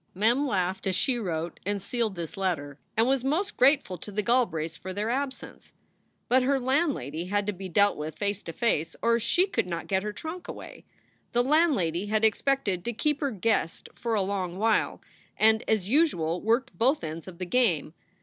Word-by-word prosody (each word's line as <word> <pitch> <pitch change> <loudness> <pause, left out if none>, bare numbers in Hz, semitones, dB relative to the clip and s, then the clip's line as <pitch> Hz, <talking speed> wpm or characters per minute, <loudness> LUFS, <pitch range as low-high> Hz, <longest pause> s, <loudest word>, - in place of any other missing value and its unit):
Mem 235 +9 +3
laughed 190 -4 -1
as 190 - +1
she 245 +5 +1
wrote 170 -5 -3
and 205 +1 -1
sealed 220 +1 -2
this 170 -2 -6
letter, 155 -7 -2 0.2
and 225 - +5
was 265 -1 +2
most 335 +10 0
grateful 260 - +3
to 205 - -8
the 210 +1 -1
Galbraiths 165 -10 +1
for 185 +3 -7
their 210 +4 -1
absence. 270 +1 -5 0.5
But 255 +1 +4
her 270 +2 +2
landlady 255 - 0
had 205 +2 0
to 210 - -1
be 190 0 -7
dealt 200 +4 +3
with 150 +1 -5
face 205 -1 -1
to - - -7
face 165 -6 0
or 235 0 +3
she 345 - +2
could 395 - -1
not 170 -2 -4
get 190 -1 0
her 210 +1 -3
trunk 320 +10 -7
away. - - -9 0.5
The 240 +1 +3
landlady 250 - +2
had 215 +1 +2
expected 220 -5 +1
to 240 - -1
keep 295 +6 0
her 285 - +1
guest 215 -6 -1
for 230 -2 -2
a 200 - +2
long 185 -2 -3
while, 220 +1 +1 0.4
and 220 0 +4
as 215 -4 +1
usual 190 - +2
worked 235 +3 +1
both 265 +6 +2
ends 160 +2 -6
of 180 -2 -9
the 185 - -4
game. 180 - +1
210 Hz, 195 wpm, -27 LUFS, 180-255 Hz, 0.5 s, and